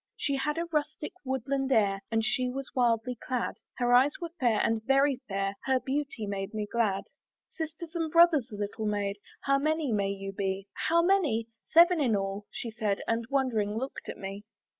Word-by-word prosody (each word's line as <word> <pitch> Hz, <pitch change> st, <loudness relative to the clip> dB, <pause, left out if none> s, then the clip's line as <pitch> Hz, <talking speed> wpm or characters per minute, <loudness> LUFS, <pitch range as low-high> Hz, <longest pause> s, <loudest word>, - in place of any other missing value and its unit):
She 280 Hz, -1 st, 0 dB
had 300 Hz, +3 st, -1 dB
a 335 Hz, -, 0 dB
rustic, 300 Hz, 0 st, -2 dB
woodland 265 Hz, +1 st, -1 dB
air, 200 Hz, -5 st, +3 dB
And 225 Hz, -1 st, +1 dB
she 250 Hz, +2 st, +1 dB
was 270 Hz, +1 st, -5 dB
wildly 240 Hz, 0 st, +2 dB
clad; 250 Hz, -2 st, -2 dB, 0.2 s
Her 245 Hz, -1 st, +2 dB
eyes 260 Hz, +4 st, +6 dB
were 340 Hz, -2 st, -5 dB
fair, 235 Hz, -4 st, +3 dB
and 225 Hz, -1 st, +1 dB
very 275 Hz, +2 st, +3 dB
fair, 195 Hz, 0 st, -1 dB
Her 265 Hz, -1 st, +3 dB
beauty 270 Hz, -4 st, -3 dB
made 200 Hz, +1 st, -4 dB
me 210 Hz, -1 st, -1 dB
glad. 205 Hz, -3 st, 0 dB, 0.5 s
"Sisters 320 Hz, 0 st, -6 dB
and 330 Hz, -2 st, -2 dB
brothers, 335 Hz, -6 st, +5 dB
little 210 Hz, +1 st, -3 dB
maid, 205 Hz, -1 st, -1 dB, 0.2 s
"How 275 Hz, 0 st, +2 dB
many 310 Hz, -1 st, 0 dB
may 200 Hz, -2 st, +1 dB
you 195 Hz, 0 st, -4 dB
be?" 195 Hz, 0 st, -2 dB, 0.2 s
"How 335 Hz, +1 st, +4 dB
many? 305 Hz, -, +2 dB, 0.2 s
seven 340 Hz, 0 st, +6 dB
in 240 Hz, -6 st, +3 dB
all," 195 Hz, +1 st, -3 dB
she 230 Hz, -, -6 dB
said, 215 Hz, -3 st, -1 dB
And 230 Hz, 0 st, 0 dB
wondering 225 Hz, -7 st, +1 dB
looked 265 Hz, +3 st, -5 dB
at -, -, -5 dB
me. 195 Hz, +1 st, -6 dB
245 Hz, 185 wpm, -29 LUFS, 210-285 Hz, 0.5 s, eyes